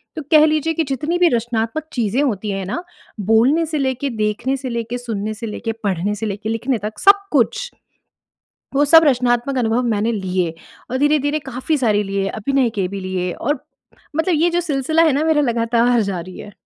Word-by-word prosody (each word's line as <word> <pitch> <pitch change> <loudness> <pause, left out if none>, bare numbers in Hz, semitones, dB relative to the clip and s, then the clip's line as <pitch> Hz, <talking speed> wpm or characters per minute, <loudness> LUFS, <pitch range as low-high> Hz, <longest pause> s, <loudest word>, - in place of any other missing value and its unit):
तो 315 - -4
कह 310 -1 +7
लीजिए 310 +1 +1
कि 325 - 0
जितनी 300 +6 -1
भी 355 0 +5
रचनात्मक 230 +3 -1
चीज़ें 235 +1 0
होती 215 -5 -1
हैं 195 -1 -3
ना 210 - -4 0.4
बोलने 230 - +3
से 310 -1 -3
लेके, 265 0 -1
देखने 220 +3 -1
से 260 -1 -5
लेके, 235 0 -3
सुनने 215 -3 -4
से 225 +1 -7
लेके, 225 +2 -4
पढ़ने 200 +1 -1
से 210 - -4
लेके 210 +1 -4
लिखने 235 +3 -1
तक 210 +2 -6
सब 400 0 +5
कुछ 295 - +1 1.0
वो 285 - +4
सब 325 +3 +7
रचनात्मक 250 -1 +1
अनुभव 230 0 +1
मैंने 230 -1 0
लिए। 185 -5 -1 0.4
और 260 - -1
धीरे-धीरे 290 +1 +2
काफ़ी 260 +5 -1
सारी 215 -5 +2
लिए 195 -1 -2
अभिनय 250 +4 0
के 190 -2 0
भी 200 +1 -6
लिए 185 -1 -3
और 290 - -2 0.6
मतलब 335 +2 +1
ये 330 +3 +2
जो 345 +1 +1
सिलसिला 315 0 +1
है 315 -3 +4
ना 295 +3 +1
मेरा 315 -2 +3
लगातार 235 -1 +2
जारी 185 -2 -5
है। 210 - -10
240 Hz, 190 wpm, -19 LUFS, 210-290 Hz, 1.0 s, कह